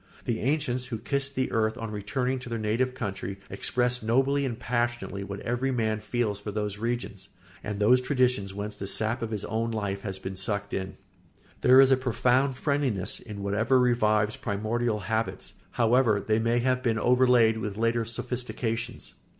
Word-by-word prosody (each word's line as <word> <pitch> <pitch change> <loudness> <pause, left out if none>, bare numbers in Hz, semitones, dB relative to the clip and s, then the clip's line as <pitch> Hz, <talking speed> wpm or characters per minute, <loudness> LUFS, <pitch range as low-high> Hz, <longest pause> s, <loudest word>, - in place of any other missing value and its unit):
The 115 -2 -1
ancients 130 -2 0
who 120 -3 -3
kissed 140 +4 -1
the 130 - 0
earth 110 0 +1
on 115 -1 -5
returning 125 +6 -2
to 125 - -9
their 115 - -2
native 115 +4 0
country 100 -4 -4
expressed 125 0 0
nobly 135 +5 +2
and 120 -3 -4
passionately 120 -5 -2
what 100 0 -6
every 120 +3 -1
man 110 -4 0
feels 110 -2 -2
for 105 - -5
those 105 0 -3
regions 115 -4 -3 0.3
and 105 0 -4
those 125 +5 +5
traditions 125 -7 +1
whence 105 +2 -5
the 100 - -6
sap 110 +4 0
of 115 - -2
his 105 -2 -3
own 115 +1 -1
life 100 -3 -2
has 95 -2 -5
been 95 0 -6
sucked 100 +1 -2
in. 95 0 -4 0.6
There 130 +1 +7
is 135 0 +7
a 130 - +6
profound 130 +1 +1
friendliness 135 - 0
in 105 -3 -8
whatever 110 +6 +2
revives 110 -4 +2
primordial 110 +2 -1
habits, 110 +4 -3 0.2
however 115 -2 +3
they 110 +2 +1
may 115 +1 +1
have 125 +1 +1
been 115 -3 +1
overlaid 125 -2 +4
with 105 -2 -4
later 115 +1 +1
sophistications. 115 0 -4
115 Hz, 175 wpm, -27 LUFS, 105-125 Hz, 0.6 s, There